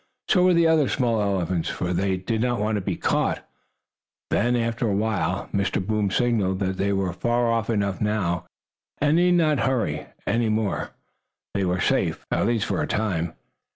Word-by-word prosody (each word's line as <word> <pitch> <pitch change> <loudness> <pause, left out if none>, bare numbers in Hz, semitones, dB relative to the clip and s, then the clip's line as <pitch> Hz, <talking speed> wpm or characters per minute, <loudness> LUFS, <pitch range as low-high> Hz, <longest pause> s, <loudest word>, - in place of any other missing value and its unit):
So 185 - +4
were 180 -1 +5
the 170 0 +4
other 160 -4 +4
small 115 -5 +1
elephants, 95 -4 -1
for 90 0 -2
they 95 +1 0
did 110 +4 -2
not 120 -2 0
want 105 +1 0
to 105 - -1
be - - -2
caught. - - -1 0.8
Then, 120 +3 +2
after 115 0 0
a 100 - +1
while, 100 -3 -1
Mr. 100 -1 0
Boom 105 -1 0
signaled 105 -4 +1
that 95 -1 -2
they 100 +1 0
were 95 -2 0
far 120 +5 0 0.2
enough 100 -3 0
off - - -17
now, 100 -5 -1 0.5
and 150 +2 +2
need 180 +1 +4
not 155 -5 +3
hurry 115 - -1 0.2
any 115 -1 +1
more. 110 -2 -1 0.6
They 100 -1 0
were 90 0 0
safe, - - 0
at - - +1
least 115 -2 +1
for - - -1
a - - -1
time. 85 -7 -1
105 Hz, 185 wpm, -24 LUFS, 95-120 Hz, 0.8 s, were